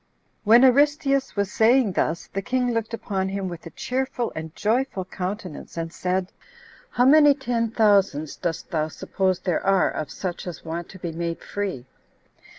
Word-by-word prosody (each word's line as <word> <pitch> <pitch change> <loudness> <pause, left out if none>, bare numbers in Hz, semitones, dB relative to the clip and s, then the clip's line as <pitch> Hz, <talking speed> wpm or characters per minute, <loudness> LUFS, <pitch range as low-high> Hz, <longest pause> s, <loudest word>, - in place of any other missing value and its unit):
3. - - -5
When 235 +3 +8
Aristeus 275 +1 +3
was 200 -1 -1
saying 230 -1 +4
thus, 170 -2 -1
the 195 - -1
king 250 +4 0
looked 230 -1 -2
upon 195 -4 -2
him 195 0 -3
with 175 -1 -7
a - - -7
cheerful 255 - -2
and 160 0 -6
joyful 220 -3 0
countenance, 185 -3 -6
and 165 0 -4
said, 185 0 -2 0.6
"How 245 - +2
many 295 +1 +7
ten 240 -4 -1
thousands 200 -9 +2
dost 170 0 -4
thou 155 -3 0
suppose 185 +3 -1
there 180 -3 -1
are 195 -1 +3
of 155 - -4
such 180 -1 -5
as 175 - -7
want 165 +1 -5
to 190 - -11
be 170 -2 -5
made 170 0 -4
free?" 190 -11 -4
195 Hz, 170 wpm, -24 LUFS, 175-240 Hz, 0.6 s, When